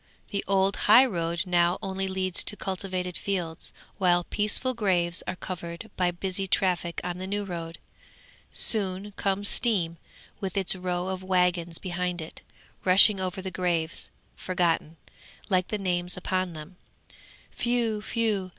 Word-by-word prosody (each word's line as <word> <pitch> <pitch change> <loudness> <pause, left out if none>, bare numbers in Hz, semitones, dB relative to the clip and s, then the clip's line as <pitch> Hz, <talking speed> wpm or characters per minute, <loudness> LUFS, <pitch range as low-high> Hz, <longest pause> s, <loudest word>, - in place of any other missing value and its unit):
The 200 - -2
old 195 0 +3
high 245 +5 +9
road 170 -5 -2
now 175 0 +2
only 195 0 -3
leads 190 -1 +1
to - - +2
cultivated 185 -2 -3
fields, 175 -5 -3 0.3
while 175 -2 +3
peaceful 210 +7 0
graves 180 -6 +1
are - - -2
covered 180 +3 -7
by 180 -1 +2
busy 190 +2 -2
traffic 180 -2 +1
on 180 0 -4
the 185 - -5
new 205 +1 -2
road. 165 -3 -6 0.7
Soon 200 -2 +4
comes 200 0 -1
Steam 180 -10 +1 0.4
with 195 0 -4
its 190 -1 +4
row 180 0 -2
of 190 -1 -4
waggons 180 -2 +1
behind 180 -1 -3
it, 160 0 -8 0.4
rushing 195 +2 +7
over 185 0 -3
the 190 - -4
graves, 170 -2 -1 0.3
forgotten, 170 -3 -1 0.5
like 185 -2 +2
the 215 - -2
names 180 -2 -1
upon 185 -1 -2
them. 160 +4 -10 0.9
Whew! 235 -3 +1
whew! 215 -4 -1
185 Hz, 140 wpm, -27 LUFS, 175-195 Hz, 0.9 s, high